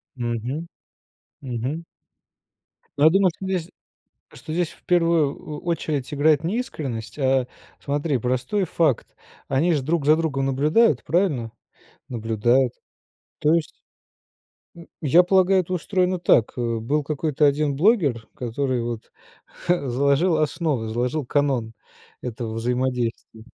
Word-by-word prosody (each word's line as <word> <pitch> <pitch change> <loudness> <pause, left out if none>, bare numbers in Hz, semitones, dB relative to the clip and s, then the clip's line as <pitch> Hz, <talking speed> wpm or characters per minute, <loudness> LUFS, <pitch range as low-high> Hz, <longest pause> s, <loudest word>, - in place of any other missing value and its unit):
Мгм, 120 +6 -3 0.8
мгм. 130 +6 -4 1.1
Но 145 - +2
я - - +9
думаю, 195 -1 +4
что 190 - -8
здесь 185 -2 -2 0.6
что 155 - -9
здесь 175 -1 0
в - - -20
первую 165 -5 +2
о 150 -1 -7
очередь 155 -4 -2
играет 150 +1 +3
не 195 +8 -1
искренность, 135 - -5
а, 130 -2 +2 0.3
смотри, 145 0 -1
простой 130 - -1
факт. 155 -6 0 0.3
Они 160 +6 +2
же 145 - +1
друг 155 +1 -1
за 155 +1 +5
другом 140 -5 -1
наблюдают, 150 - +3
правильно? 150 - 0 0.6
Наблюдают. 120 +1 +1 0.7
То 155 +2 +3
есть 165 -2 +1 1.1
м, 170 0 -12
я 160 +5 +5
полагаю, 190 +1 +4
это 185 +1 -5
устроено 180 0 0
так: 120 -9 +3
э, 115 -1 -1
был 145 +6 0
какой-то 150 0 0
1 145 0 +2
блогер, 150 - +2
который 125 +1 -2
вот, 115 -2 -6 0.5
ха, 170 -7 +1
заложил 140 +7 +2
основы, 155 -6 -1
заложил 125 +5 -1
канон 130 -5 0 0.5
этого 120 -2 -5
взаимодействия. 120 -2 -2
145 Hz, 125 wpm, -23 LUFS, 125-165 Hz, 1.1 s, я